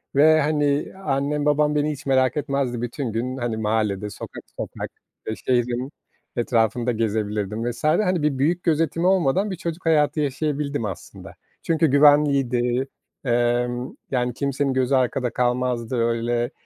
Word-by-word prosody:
ve, 155 +2 +6
hani, 145 -1 0
annem 145 +1 0
babam 150 0 +2
beni 150 +1 +1
hiç 145 -1 -8
merak 130 +2 +2
etmezdi. 140 -5 -1
Bütün 120 0 -3
gün, 125 +4 -3
hani, 120 -3 -2
mahallede, 105 -2 -1
sokak 100 - -9
sokak - - -5 0.4
ve 110 - -2
şehrin 125 +2 -1 0.4
etrafında 120 0 +1
gezebilirdim 110 0 -1
vs. 120 - -11
hani, 180 +2 +2
bir 150 -3 +1
büyük 165 +6 +1
gözetimi 165 +1 +1
olmadan 190 +2 +2
bir 185 - -3
çocuk 170 +1 -5
hayatı 155 -1 +3
yaşayabildim 145 -2 -1
aslında. 95 -4 -8 0.3
Çünkü 160 -1 +2
güvenliydi, 135 -3 +3 0.4
emm, 120 +1 0 0.2
yani 125 -2 0
kimsenin 140 +1 -1
gözü 130 +1 +2
arkada 125 0 +1
kalmazdı 125 0 -1
öyle, 120 +1 0
130 Hz, 135 wpm, -23 LUFS, 120-150 Hz, 0.4 s, ve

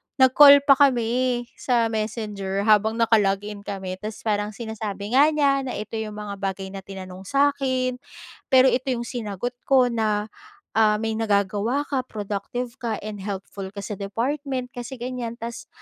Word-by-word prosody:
nag-call 280 +2 +8
pa 280 0 +5
kami 250 -2 +2 0.2
sa 235 -3 +1
Messenger 210 -3 -3
habang 215 +1 +4
nakalog-in 210 -3 +1
kami. 190 -2 -5
Tapos 215 +1 -7
parang 210 -1 -1
sinasabi 215 -3 -5
nga 275 +4 +6
niya 285 -3 +2
na, 250 - -4
"Ito 220 +1 -5
'yong 215 -1 -5
mga 205 -1 -6
bagay 190 -1 -4
na 195 - -6
tinanong 190 -1 -9
sa 280 +4 +3
'kin. 255 -2 -1 0.5
Pero 260 -1 +6
ito 255 +2 -1
'yong 235 - -4
sinagot 235 -2 -4 0.2
ko 255 -3 +4
na, 215 -2 -1 0.4
ah, 215 -1 +4
may 220 0 -1
nagagawa 210 +5 +1
ka, 275 - 0
productive 215 +3 -4
ka, 230 -3 -2
and 210 -1 -6
helpful 195 -1 -5
ka 200 - -6
sa 210 -2 -6
department 255 +5 -3
kasi 245 +2 -7
ganyan. 245 -1 -5
Tapos 235 0 -7
225 Hz, 160 wpm, -24 LUFS, 205-255 Hz, 0.5 s, nag-call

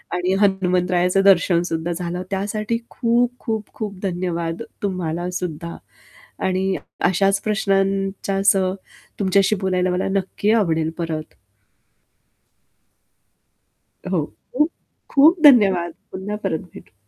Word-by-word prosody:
आणि 180 +1 0
हनुमंतरायाचं 180 -1 +2
दर्शन 190 -3 +4
सुद्धा 165 +1 -2
झालं 175 +1 -4
त्यासाठी 210 +3 -1
खूप, 240 0 +1
खूप, 220 -3 -4
खूप 205 -4 -6
धन्यवाद 175 -2 -2 0.2
तुम्हाला 175 -2 -2
सुद्धा. 170 -1 -5 0.7
आणि 190 +1 0 0.3
अशाच 195 +2 +2
प्रश्नांसह 195 -2 +1 0.5
तुमच्याशी 195 +1 +3
बोलायला 185 -1 +1
मला 180 +1 -1
नक्की 195 +2 0
आवडेल 160 -8 +2
परत. 160 -2 -4 2.8
हो, 170 -6 +1 0.3
खूप 300 +5 +2 0.4
खूप 315 +5 +5
धन्यवाद 195 - +6 0.2
पुन्हा 200 +3 -4
परत 160 - 0 0.2
भेटू. - - -14
190 Hz, 100 wpm, -21 LUFS, 175-200 Hz, 2.8 s, धन्यवाद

